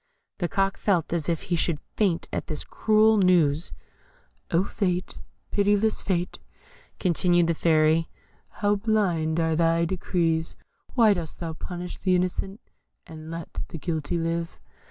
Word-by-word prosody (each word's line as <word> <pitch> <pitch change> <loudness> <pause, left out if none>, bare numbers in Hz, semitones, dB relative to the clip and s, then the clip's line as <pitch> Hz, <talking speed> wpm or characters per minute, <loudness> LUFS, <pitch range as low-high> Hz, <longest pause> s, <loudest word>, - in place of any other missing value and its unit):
The 175 - 0
Cock 195 0 0
felt 175 -6 +1
as 165 -2 -1
if 165 -2 -1
he 175 - -1
should 165 -2 0 0.2
faint 190 -6 +1
at - - -3
this 155 -2 -2
cruel 220 0 +3
news. 170 -4 +3 0.8
"Oh, 170 +2 +2
Fate! 185 -3 -2 0.3
pitiless 205 +1 +2
Fate!" 180 -2 -2 0.6
continued 175 -1 +3
the 170 - +1
Fairy, 160 0 +3 0.4
"how 205 0 0
blind 180 -7 +1
are 160 -1 +1
thy 165 +1 +2
decrees! 165 -2 -1 0.4
Why 225 -5 +6
dost 170 -5 -6
thou 165 -2 -4
punish 180 +2 -7
the 185 -2 +2
innocent, 185 +4 -2 0.4
and 160 0 -10
let 165 0 -6
the - - -7
guilty 160 +1 -2
live?" 165 0 -2
175 Hz, 140 wpm, -26 LUFS, 165-195 Hz, 0.8 s, Why